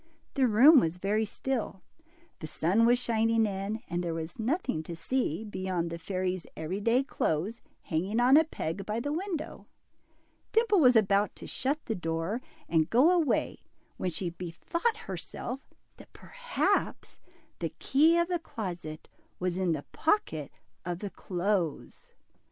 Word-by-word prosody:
The 265 -3 +3
room 260 +8 +8
was 165 -4 -1
very 210 +4 0
still, 225 -3 -3 0.6
the 155 - -6
sun 195 +9 +2
was 245 +1 +5
shining 225 -2 +2
in, 200 +2 -3
and 175 +1 -2
there 170 -2 -2
was 165 +3 -6
nothing 255 - -1
to 165 +2 -7
see, 180 - -1
beyond 185 -5 -3
the 170 - -5
fairy's 185 0 -2
every 160 +5 -3
day 235 +5 +3
clothes 205 - -1 0.2
hanging 190 +7 -1
on 250 +3 +6
a 315 - +7
peg 195 - -4
by 215 +3 -2
the 290 +5 -2
window. 340 -2 -4 0.9
Dimple 445 -3 +4
was 250 -5 +6
about 205 -1 +3
to - - -10
shut 280 +4 -2
the 225 - -1
door 165 +5 -2 0.3
and 160 -1 +2
go 265 +9 +5
away, 340 -5 +1 0.4
when 185 - -1
she 175 +1 -3
bethought 185 - -2
herself 270 - -6 0.4
that - - -16
perhaps - - -2 0.4
the - - -1
key 315 +5 +4
of 340 0 +2
the 350 -1 -1
closet 180 - -6 0.3
was 180 -1 -1
in 185 -2 +1
the 145 -2 -4
pocket 165 - 0 0.3
of 175 -1 -3
the 200 +1 -6
clothes. 180 -3 -2
210 Hz, 150 wpm, -29 LUFS, 175-265 Hz, 0.9 s, room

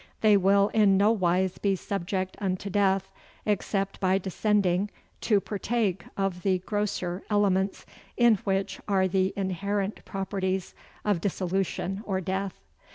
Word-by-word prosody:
They 215 -2 +6
will 200 +1 +4
in 205 -3 +4
no 205 +3 +5
wise 185 -3 +1
be 200 -1 +2
subject 190 0 -3
unto 195 0 -2
death, 195 -1 +2 0.3
except 200 -1 -1
by 190 0 +3
descending 195 0 +1 0.4
to 210 -3 +5
partake 205 -1 -1
of 195 -2 -1
the 190 -1 +2
grosser 190 -2 -2
elements, 200 -2 +1 0.3
in 235 -3 +5
which 195 0 -2
are 190 -2 +3
the 190 +1 +1
inherent 200 +1 -2
properties 190 -1 -2 0.3
of 205 -5 +1
dissolution 190 +1 -1
or 190 -2 0
death. 190 +1 -2
195 Hz, 130 wpm, -27 LUFS, 185-205 Hz, 0.4 s, They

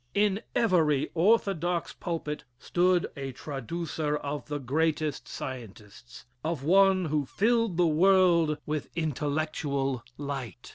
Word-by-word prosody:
In 205 0 +2
every 160 - +2
orthodox 175 -2 +1
pulpit 160 -4 -4
stood 180 +5 +2
a 135 -1 -5
traducer 150 +3 -3
of 145 0 -5
the 145 -1 -2
greatest 150 +2 -1
of - - -10
scientists 115 -2 -9 0.2
of 160 -3 -2
one 190 +3 +4
who 150 -3 -1
filled 230 - +1
the 175 - +4
world 170 -1 +4
with 150 -1 -3
intellectual 145 -3 -1 0.2
light. 135 -7 -6
155 Hz, 115 wpm, -28 LUFS, 140-175 Hz, 0.2 s, one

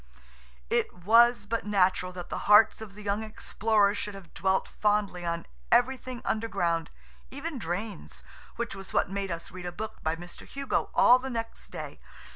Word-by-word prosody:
It - - +2
was 235 +2 +5
but 230 +2 -2
natural 185 -3 +2
that 180 -1 -7
the - - -3
hearts 210 +1 +7
of 205 -3 -9
the 210 - -10
young 205 +1 0
explorers 215 -1 +1
should 210 -1 -4
have 190 -4 -12
dwelt 190 +1 +1
fondly 205 -4 0
on 170 0 -2 0.3
everything 255 0 +2
underground, 175 -7 0 0.4
even 285 +1 -5
drains, 175 - -5 0.3
which - - -3
was 195 -1 -7
what - - +2
made 195 0 -2
us 170 -1 -5
read 180 -1 -7
a - - -3
book 215 +5 -7
by 160 +1 0
Mr. 175 +1 -11
Hugo 275 0 -2
all 250 - +7
the 265 +1 -5
next 230 -2 -4
day. - - -8
205 Hz, 170 wpm, -28 LUFS, 180-225 Hz, 0.4 s, hearts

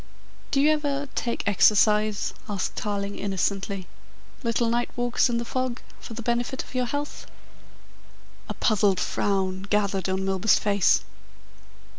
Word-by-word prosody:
"Do 275 - +1
you 295 +2 +5
ever 285 -2 -1
take 235 -4 -2
exercise?" 210 +1 +3 0.2
asked 200 -2 -2
Tarling 200 -1 -3
innocently. 195 0 -1 0.6
"Little 235 -1 +1
night 235 +1 0
walks 245 +1 +2
in 235 - 0
the 235 - -2
fog 255 0 -2 0.2
for 230 - -9
the 235 - -6
benefit 240 +3 -1
of - - -15
your 250 -1 0
health?" 290 +3 -4 1.2
A - - -4
puzzled 200 -4 +2
frown 190 -2 0
gathered 200 -3 +1
on 190 +1 -1
Milburgh's 195 +2 +3
face. 200 -2 +3
215 Hz, 135 wpm, -25 LUFS, 200-245 Hz, 1.2 s, you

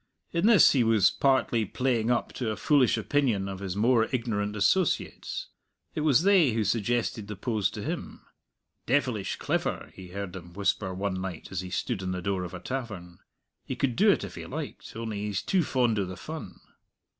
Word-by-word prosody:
In 170 +4 +2
this 225 -4 +7
he 130 -4 +3
was 110 -4 +4
partly 130 -4 +2
playing 115 +2 0
up 120 - 0
to 125 -4 -2
a 110 - -1
foolish 135 -3 +3
opinion 110 -3 +1
of 95 -1 -5
his 95 -2 -4
more 115 +2 +4
ignorant 105 -4 -1
associates; 145 - 0 0.4
it - - -2
was 150 0 +4
they 185 - +5
who 110 -1 +1
suggested 110 0 0
the 105 - -5
pose 105 0 0
to 105 -1 -7
him. - - -5 0.6
"Devilish 125 -6 +1
clever!" - - -2
he 95 -1 -10
heard 95 0 -6
them 85 -2 -9
whisper 100 0 0
one 95 0 -2
night 95 -4 -6
as 95 -2 -2
he 90 - -7
stood 100 +3 -2
in 95 -1 -2
the 90 - -3
door 95 -1 -1
of 90 - -6
a - - -6
tavern; 100 -10 -6 0.4
"he - - -4
could 125 -4 0
do 210 +4 +5
it 200 - +3
if - - -6
he - - -8
liked, - - -7
only 110 -2 -4
he's 105 -1 -2
too 190 - +2
fond 120 -7 +1
o' 100 - 0
the 90 0 -7
fun." 155 - -8
110 Hz, 195 wpm, -28 LUFS, 95-130 Hz, 0.6 s, this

